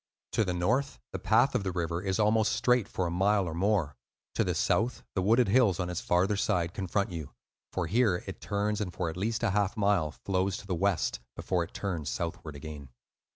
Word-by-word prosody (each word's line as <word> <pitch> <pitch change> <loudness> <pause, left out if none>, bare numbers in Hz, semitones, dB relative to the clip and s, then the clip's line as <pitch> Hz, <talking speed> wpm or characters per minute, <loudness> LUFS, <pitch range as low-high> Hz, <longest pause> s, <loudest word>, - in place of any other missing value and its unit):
To 110 - +2
the 90 -3 -1
north 125 +11 0
the - - -4
path - - +3
of - - 0
the 95 - -1
river 85 -1 -2
is 95 -1 -1
almost 110 0 +3
straight 125 -4 +2
for 95 - -2
a 85 - -1
mile 95 +2 +2
or 80 - -3
more; 90 -5 +1 0.4
to - - +2
the - - -1
south 120 +3 +1
the 95 - 0
wooded 115 +6 +4
hills 110 -5 +4
on 90 -1 -1
its 90 - -3
farther 90 +4 +2
side 90 -5 0
confront 100 +1 -1
you, 80 -5 -7 0.4
for 95 - -1
here 105 0 +2
it - - -8
turns 105 +1 -1
and 95 -4 -2
for 85 -1 -2
at - - -10
least 110 +5 -1
a 115 - +2
half 105 +2 0
mile 100 -6 +2
flows 95 +3 -1
to - - -10
the 95 - -2
west, 95 +1 0 0.2
before 90 -2 0
it 85 - -11
turns 85 -7 -3
southward 85 -3 -4
again. 70 -1 -8
95 Hz, 215 wpm, -29 LUFS, 85-105 Hz, 0.4 s, wooded